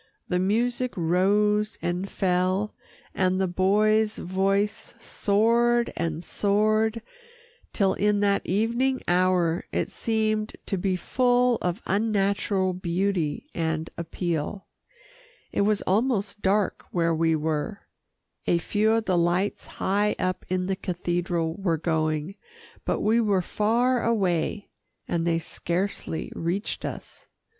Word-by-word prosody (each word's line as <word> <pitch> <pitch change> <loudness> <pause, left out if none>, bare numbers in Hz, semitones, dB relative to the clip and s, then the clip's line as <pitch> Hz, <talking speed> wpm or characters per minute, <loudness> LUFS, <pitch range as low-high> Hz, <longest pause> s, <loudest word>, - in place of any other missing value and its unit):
The 180 - +1
music 240 +6 0
rose 205 +5 +2
and 180 +3 -2
fell, 185 +2 0 0.4
and 185 0 +1
the 190 - +2
boy's 210 +4 +2
voice 195 +3 -1
soared 235 +3 +2
and 165 0 -2
soared 215 +3 +1 0.7
till 195 -3 +2
in 210 0 +1
that 200 -1 +2
evening 235 +7 0
hour, 180 -2 +2
it - - -1
seemed 215 -1 -1
to 195 - -2
be 185 0 0
full 245 +4 +2
of 180 +4 -2
unnatural 200 -2 +1
beauty 180 - -1
and 160 -1 -2
appeal. 170 +2 -3 0.9
It - - 0
was 205 0 +2
almost 205 -1 0
dark 200 +1 +1
where 170 -1 +1
we 160 0 +2
were. 155 +6 -2 0.7
A 170 - +4
few 210 +5 +1
of 225 -1 +1
the 185 -3 +2
lights 175 +4 0
high 205 +2 0
up 185 0 -2
in 185 0 0
the 190 +1 -1
cathedral 175 -2 -2
were 175 -4 +1
going, 155 +1 -1 0.5
but - - 0
we 225 +2 +3
were 200 -4 +2
far 235 +6 +1
away, 200 -3 0 0.4
and 170 0 -1
they 165 -1 +2
scarcely 170 +1 -3
reached 175 +5 -2
us. - - -8
195 Hz, 120 wpm, -26 LUFS, 175-215 Hz, 0.9 s, A